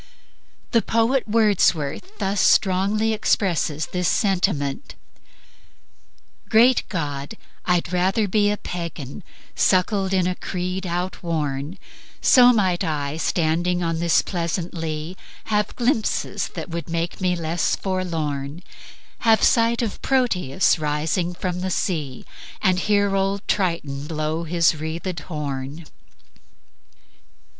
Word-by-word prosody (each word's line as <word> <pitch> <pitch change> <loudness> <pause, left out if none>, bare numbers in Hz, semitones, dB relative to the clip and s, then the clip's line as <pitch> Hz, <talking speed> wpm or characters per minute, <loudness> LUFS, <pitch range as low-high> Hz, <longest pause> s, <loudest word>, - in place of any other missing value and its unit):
The 230 - +4
poet 230 +4 +1
Wordsworth 210 - +1
thus 195 0 0
strongly 205 +3 +3
expresses 170 -8 0
this 180 +1 -2
sentiment: 180 -9 0 0.8
"... - - -36 0.7
Great 240 +3 +5
God, 145 -1 -4 0.3
I'd 180 -1 +1
rather 190 +4 +2
be 205 +1 +2
A 210 - 0
Pagan, 170 -3 -6 0.3
suckled 190 +1 +2
in 185 -2 +2
a 180 - +1
creed 185 +1 -4
outworn, 170 -3 -3 0.4
So 250 -1 +7
might 190 -6 +1
I, 150 -3 -2
standing 175 +2 0
on 165 -1 -1
this 170 -1 +3
pleasant 170 -1 -3
lea, 160 0 -4 0.3
Have 210 -1 -1
glimpses 235 -3 0
that - - -5
would 170 0 -5
make 170 +2 -3
me 180 -1 +2
less 165 0 0
forlorn; 165 -5 -3 0.6
Have 225 -1 +3
sight 230 0 +3
of 220 - -4
Proteus 185 - +2
rising 155 +4 -1
from 180 0 -3
the 185 +1 -2
sea, 155 -8 -2 0.3
And 185 -2 +2
hear 200 0 +2
old 195 +1 -1
Triton 155 -7 -1
blow 155 +1 -2
his 170 0 +3
wreathed 165 +3 -4
horn." 150 -1 -5
180 Hz, 115 wpm, -22 LUFS, 160-200 Hz, 0.8 s, So